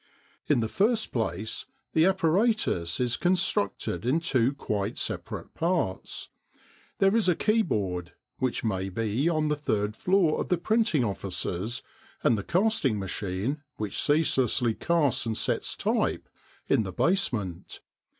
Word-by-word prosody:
In 120 - +3
the 110 - 0
first 220 - +1
place, 110 -2 -3 0.3
the 160 0 +4
apparatus 190 - +1
is 125 -1 +1
constructed 165 - 0
in 130 +7 +2
two 130 -7 +2
quite 105 -7 -2
separate - - -4
parts. 165 - -2 0.7
There 195 +2 +3
is 220 -5 +4
a 175 - +3
keyboard, 100 - 0 0.3
which 130 -2 -1
may 95 -4 -1
be 115 - 0
on 155 -2 +1
the 150 - +2
third 105 -8 -1
floor 180 -1 +2
of - - -5
the 180 - +3
printing 215 - +2
offices, 100 - -3 0.4
and 120 - +4
the 105 - -2
casting 180 - +1
machine, 100 - -3
which 105 -2 -2
ceaselessly 130 -6 +2
casts 140 -5 +1
and 110 - -1
sets - - 0
type - - 0 0.4
in - - +3
the 95 -3 -4
basement. 105 - 0
125 Hz, 135 wpm, -27 LUFS, -, 0.7 s, the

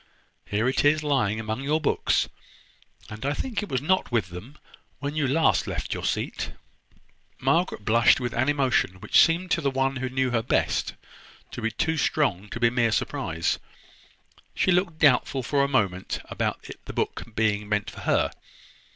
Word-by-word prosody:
Here 105 +4 0
it 130 - +1
is, 155 +1 +3
lying 125 -8 +1
among 110 +2 -3
your 150 +3 +1
books; 150 - +1 0.8
and 105 +2 -8
I 145 +2 0
think 240 - -3
it 210 - -6
was 130 0 -1
not 185 0 +1
with 110 -7 0
them 105 - -10 0.4
when 145 +1 -4
you 150 -3 +1
last 160 +5 +2
left - - -3
your - - -4
seat." - - -2 0.9
Margaret 135 - 0
blushed 115 +2 +5
with 120 -2 -3
an 130 +4 +1
emotion 135 -9 +1
which - - +3
seemed 175 +2 0
to 170 - +2
the 140 - +1
one 135 0 0
who 130 0 -3
knew 130 0 0
her 115 -2 +1
best 115 - 0 0.6
to - - -6
be 115 - 0
too 160 +8 -1
strong 105 - 0
to 115 - -6
be 120 -1 +3
mere 120 -2 +2
surprise. 85 -5 -1 1.0
She - - +2
looked 180 -2 +1
doubtful 135 -3 +3
for 140 +3 +1
a - - +2
moment 100 -9 0
about - - -3 0.2
the - - -7
book - - -2
being 105 -2 0
meant 105 -1 -1
for - - -11
her. - - +1
130 Hz, 175 wpm, -25 LUFS, 110-145 Hz, 1.0 s, blushed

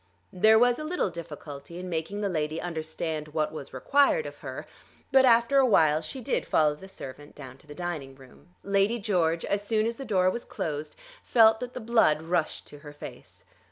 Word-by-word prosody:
There 220 +4 +5
was 245 +3 +3
a - - -4
little 310 - -1
difficulty 150 -1 -9
in 185 +1 -6
making 180 +4 -3
the 205 - 0
lady 155 -3 -2
understand 160 -2 -4
what 155 -1 0
was 140 -3 -8
required 285 - +2
of - - -8
her, - - -7 0.5
but 265 0 +6
after 235 +3 +5
a 270 - +5
while 155 -8 +4
she 210 +12 -7
did - - -1
follow 150 -1 +3
the 170 +6 -12
servant 145 -6 -10
down 130 -2 -11
to - - -19
the 150 - -10
dining 155 -6 -5
room. 130 +3 -18 0.2
Lady 200 +3 +2
George, 175 -6 0
as 200 0 -1
soon 215 +1 0
as 230 0 -2
the 275 - -6
door 185 -6 +2
was 235 - -5
closed, 155 -5 -5 0.3
felt 225 -2 +5
that 250 0 -7
the - - -4
blood 220 -9 +2
rushed 165 -1 -1
to 145 - -13
her 145 0 -11
face. 145 - -12
175 Hz, 200 wpm, -27 LUFS, 150-220 Hz, 0.5 s, but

